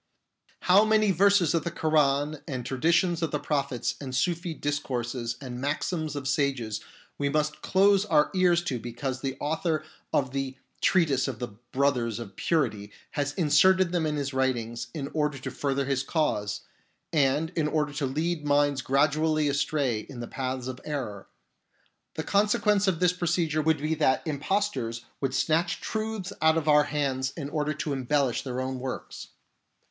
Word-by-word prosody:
How 190 +3 +6
many 215 -1 +3
verses 190 -2 +4
of 165 -2 +1
the - - -2
Koran 150 -2 +1
and 130 -4 -4
traditions 165 +5 +2
of 165 - 0
the 150 - -1
prophets 140 -5 -1
and 130 -2 -5
Sufi 170 +4 0
discourses 125 -5 -2
and 125 -2 -7
maxims 155 +2 -2
of 140 -2 -4
sages 130 -6 0 0.4
we 140 0 +1
must 150 +1 -1
close 195 +1 +4
our 155 -7 +3
ears 180 -2 +3
to 130 -8 -2
because 125 +2 -4
the 135 -1 -3
author 160 +1 -1 0.3
of 130 -2 +1
the 135 -1 -3 0.2
Treatise 150 -8 +3
of 130 -4 -4
the 120 +1 -4 0.2
Brothers 130 -5 +1
of 105 -5 -8
Purity 120 -11 0 0.2
has 145 -1 -2
inserted 185 +3 +4
them 170 -3 +1
in 150 - -1
his 140 -2 -2
writings 120 -3 -1
in 140 -3 -3
order 150 -2 0
to 130 - -6
further 140 -1 -1
his 135 -1 0
cause, 135 -9 -1 0.5
and 150 +2 +2
in 160 -4 0
order 150 -1 0
to 145 -2 -1
lead 155 +4 -1
minds 145 -1 +2
gradually 150 +3 +2
astray 140 -4 0
in 120 +3 -9
the 120 - -5
paths 130 -1 -3
of 130 -1 -6
error! 120 -10 -5 0.9
The 160 - -3
consequence 205 +1 +2
of 180 -3 +1
this 180 -1 +4
procedure 170 -3 0
would 160 0 +2
be 155 +2 -1
that 150 -3 +2
impostors 140 - -1
would 135 -1 -1
snatch 160 +5 +1
truths 220 -3 -3
out 160 0 +4
of 160 -1 -2
our 150 -1 +6
hands 135 -3 -1
in 145 -3 -5
order 150 -1 -1
to 150 -1 -2
embellish 135 -1 +1
their 130 -2 -4
own 130 0 -3
works. 130 0 -6
145 Hz, 165 wpm, -27 LUFS, 130-160 Hz, 0.9 s, How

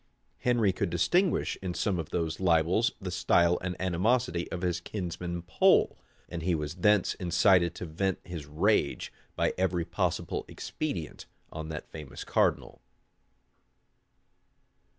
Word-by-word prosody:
Henry 115 -6 +2
could 95 0 -1
distinguish 175 - +1
in 90 -2 -4
some 95 -4 0
of 80 -1 -5
these 80 -2 -2
libels 90 +5 +3
the 95 -3 -5
style 85 0 +3
and 90 -1 -4
animosity 95 +2 0
of 90 - -4
his 90 -1 0
kinsman 85 -2 -4
Pole; 90 - +4 0.3
and 85 -1 -5
he 85 +1 +1
was 75 -1 -3
thence 100 +2 +3
incited 90 0 +3
to - - -5
vent 90 +4 -1
his 85 -5 -7
rage, 80 +1 +1 0.2
by - - +1
every 90 -2 +1
possible 85 -2 -1
expedient, 90 - -5 0.2
on 80 0 -6
that 75 -1 -7
famous 75 -4 -8
cardinal. - - 0
90 Hz, 130 wpm, -29 LUFS, 85-95 Hz, 0.3 s, Pole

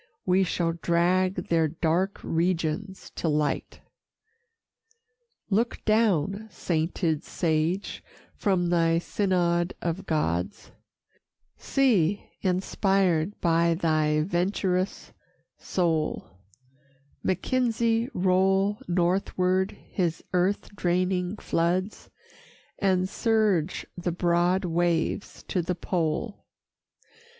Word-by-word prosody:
We 185 +1 +3
shall 170 -2 0
drag 175 +2 +1
their 165 -1 +3
dark 170 +5 0
regions 170 +3 -2
to - - -3
light. 150 -1 -1 1.7
Look 230 +4 0
down, 215 -2 +2
sainted 165 -3 -1
sage, 165 +3 -1 0.3
from 185 -4 0
thy 165 -1 +3
synod 175 -1 0
of 175 +3 -3
Gods; 90 - -2 0.8
See, 205 -9 +1
inspired 190 -1 +1
by 170 0 +3
thy 155 -3 +1
venturous 185 +2 -1 0.5
soul, 165 -4 -1 1.0
Mackenzie 230 +3 0
roll 190 +3 +2
northward 185 +1 +1
his 170 -4 -1
earth 185 +3 0
draining 180 +1 0
floods, 180 +4 -1 0.7
And 185 -2 +2
surge 205 -6 +1
the 175 0 -2
broad 175 +2 +1
waves 170 +2 -1
to 185 - +1
the 180 +2 -2
pole. 170 +4 -2
180 Hz, 85 wpm, -26 LUFS, 165-195 Hz, 1.7 s, We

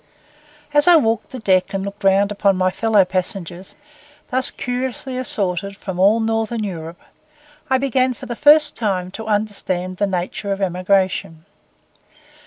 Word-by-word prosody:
As 295 +2 +4
I 350 - +8
walked 225 -7 +1
the 260 - -8
deck 190 -4 +1
and 195 0 -2
looked 200 +1 -8
round 195 +1 +3
upon 200 -2 +1
my 185 0 +1
fellow 215 -2 +3
passengers, 185 -1 -5 0.6
thus 260 +1 +2
curiously 255 +1 -4
assorted 200 -5 -2
from 190 -3 -6
all 205 +4 +4
northern 225 0 -1
Europe, 170 -4 -6 0.7
I 260 - +3
began 260 -1 +1
for - - -10
the 240 - -5
first 300 +3 +6
time 185 -5 -2
to 220 +3 -8
understand 200 -4 -2
the 205 - +1
nature 190 +2 -3
of 195 - -2
emigration. 185 -3 0
200 Hz, 150 wpm, -20 LUFS, 185-230 Hz, 0.7 s, I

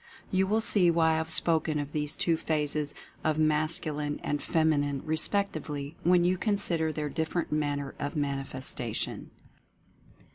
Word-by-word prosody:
You 190 -1 +2
will 215 +3 +2
see 190 -5 +4
why 165 -1 +3
I 160 - +1
have 160 0 -2
spoken 160 -1 +1
of 145 -1 -4
these 150 0 -1
two 170 - +2
phases 150 -2 0 0.3
as 155 -1 +1
Mascu 155 0 +2
line 145 0 -3
and 145 -1 -1
Feminine 145 -4 +1
respectively 155 -3 0
when 175 0 +4
you 180 +1 +1
consider 180 -7 +1
their 150 -1 -3
different 160 +3 -2
manner 145 -2 -1
of 145 -1 -3
manifestation. 135 -5 -2
155 Hz, 145 wpm, -29 LUFS, 145-165 Hz, 0.3 s, see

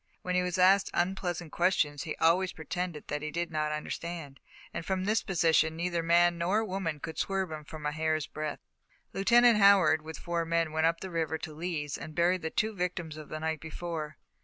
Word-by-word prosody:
When 180 - -2
he 180 - +3
was 180 0 -2
asked 190 +2 +5
unpleasant 175 -2 -1
questions, 160 -5 +1
he 155 - -4
always 180 +3 +2
pretended 165 0 -5
that 150 0 -3
he 155 - -3
did 170 +2 -3
not 155 -1 -1
understand, 150 -1 -5 0.3
and - - -4
from 190 +1 -1
this 215 +2 +2
position 160 -4 +2
neither 170 0 -1
man 170 +1 +3
nor 200 +6 +1
woman 185 -6 -3
could 160 +2 -6
swerve 190 -3 -1
him 155 0 -8
a 150 - +1
hair's 155 0 0
breadth. 155 -1 -5 0.5
Lieutenant 235 +2 +5
Howard, 195 -6 +6
with 160 0 -8
four 170 -1 -2
men, 165 -1 0
went 160 +1 +2
up 165 0 -1
the 190 - -6
river 160 -2 -1
to 160 -1 -7
Lee's 150 -3 -3
and 155 - -8
buried 180 +1 +2
the 160 - -2
two 220 +6 0
victims 175 -4 -3
of 155 -1 -10
the 155 - -5
night 160 0 -2
before. 160 -1 -5
170 Hz, 200 wpm, -30 LUFS, 155-180 Hz, 0.5 s, Howard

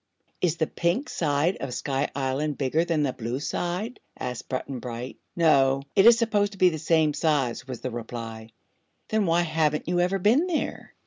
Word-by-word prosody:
"Is 170 -2 +1
the 160 - +2
Pink 175 - -1
side 155 +3 +1
of 130 -3 -5
Sky 140 +1 -1
Island 140 +2 -1
bigger 145 +4 +1
than 165 -3 0
the 135 -3 0
Blue 120 +3 -4
side?" 180 - -3 0.2
asked 125 -1 -5
Button 130 0 -3
Bright. 120 +1 -6 0.2
"No; 135 -5 +4
it 195 +2 +6
is 235 -1 +8
supposed 210 -3 +1
to - - -12
be 185 -1 +6
the 160 -2 -4
same 160 -1 +2
size," 135 -6 0
was 130 -3 -6
the 130 - -3
reply. 115 -1 -6 0.6
"Then 215 -3 +1
why 170 +1 +3
haven't 155 -2 0
you 175 0 +1
ever 180 +2 +2
been 235 - +3
there? 335 -4 -3
155 Hz, 185 wpm, -26 LUFS, 130-180 Hz, 0.6 s, is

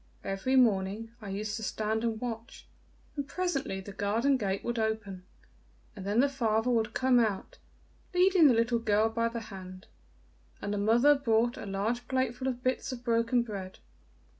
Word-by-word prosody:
Every 195 +7 -1
morning 220 -2 +2
I 205 - -7
used 210 +2 -3
to 220 - -6
stand 220 +1 -1
and 225 -2 -1
watch, 230 0 -6 0.5
and 285 -2 -3
presently 280 - -2
the 200 - -9
garden 220 +8 +1
gate 195 -5 -2
would 240 -1 -2
open, 210 -4 -3 0.7
and 195 -3 -8
then 210 +4 +3
the 280 - +4
father 235 -3 0
would 225 -1 0
come 255 -1 +4
out, 225 - -1 0.5
leading 360 -2 +5
the 250 - +5
little 230 +1 +2
girl 220 -1 +2
by 230 +1 0
the 230 0 -4
hand, 185 0 -9 0.7
and 205 - -3
the 205 - -1
mother 235 +8 +5
brought 240 -4 +1
a - - -7
large 220 +5 -2
plateful 260 0 -1
of 250 -1 -3
bits 255 +1 -1
of 245 -1 -7
broken 235 0 +2
bread. 195 -5 -7
230 Hz, 170 wpm, -30 LUFS, 205-250 Hz, 0.7 s, leading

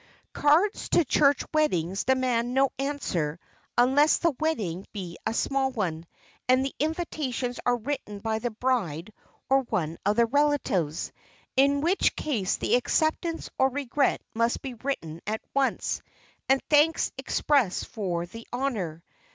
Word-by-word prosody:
Cards 320 +8 +2
to 340 - +4
church 280 +2 +3
weddings 195 - +1
demand 250 -2 +1
no 270 0 +3
answer 180 - -2 0.4
unless 270 +5 +5
the 335 -3 +1
wedding 210 - -1
be 180 -5 -6
a 220 - 0
small 270 +1 +1
one 175 -9 -3 0.4
and 255 +1 +4
the 275 - -3
invitations 290 -6 -2
are 245 - +4
written 230 -4 -4
by 220 +2 -2
the 240 +2 -2
bride 215 - -1 0.3
or 270 0 +4
one 175 -10 -2
of 205 +2 +2
the 235 +1 +4
relatives, 240 - 0 0.4
in 280 +1 +4
which 350 +6 +2
case 220 -11 -1
the - - -1
acceptance 315 +6 +1
or 265 0 +5
regret 280 +1 0
must 230 +1 0
be 265 -2 -5
written 195 - -4
at 220 +1 -2
once, 275 -1 0 0.5
and 270 0 +3
thanks 305 +2 +3
expressed 270 -11 +1
for 175 -5 -3
the 225 +6 -11
honor. 210 - -2
250 Hz, 140 wpm, -27 LUFS, 205-285 Hz, 0.5 s, unless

